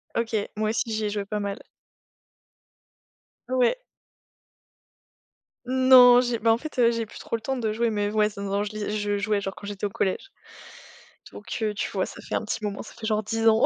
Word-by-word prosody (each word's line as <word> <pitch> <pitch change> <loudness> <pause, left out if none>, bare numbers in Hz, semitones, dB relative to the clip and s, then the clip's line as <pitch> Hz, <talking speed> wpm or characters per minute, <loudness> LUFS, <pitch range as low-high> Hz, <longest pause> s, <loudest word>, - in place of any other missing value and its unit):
OK. 230 0 -1 0.2
Moi 215 0 0
aussi 225 +1 -1
j'y 215 0 -1
ai - - 0
joué 205 -1 -3
pas 210 +1 -3
mal. 200 0 -3 1.9
Ouais. 255 - +3 1.9
Non 255 -1 +7
j'ai 240 -2 -1
bah 225 +1 +3
en 230 - -1
fait, 305 -2 -8
heu, 235 -1 +5
j'ai 230 -2 -2
plus - - -12
trop - - -4
le 225 - -5
temps 265 +3 -2
de 220 -3 -1
jouer, 235 +1 +1
mais 205 -1 -1
ouais, 215 0 +3
non, 200 - -4
non, 200 +1 -1
je 210 - -4
li 215 0 -3
je 205 0 -1
jouais 205 0 0
genre 195 0 -4
quand 205 - -11
j'étais 205 0 -3
au - - -8
collège. 195 - -2 1.0
Donc - - -6
heu, 210 -1 0
tu 205 - -3
vois, - - 0
ça - - -10
fait - - -4
un - - -1
petit 220 - -3
moment, 200 -1 -3
ça - - -12
fait 220 - -6
genre 215 -1 +1
10 225 +2 0
ans, 220 +1 +5
215 Hz, 215 wpm, -25 LUFS, 205-235 Hz, 1.9 s, Non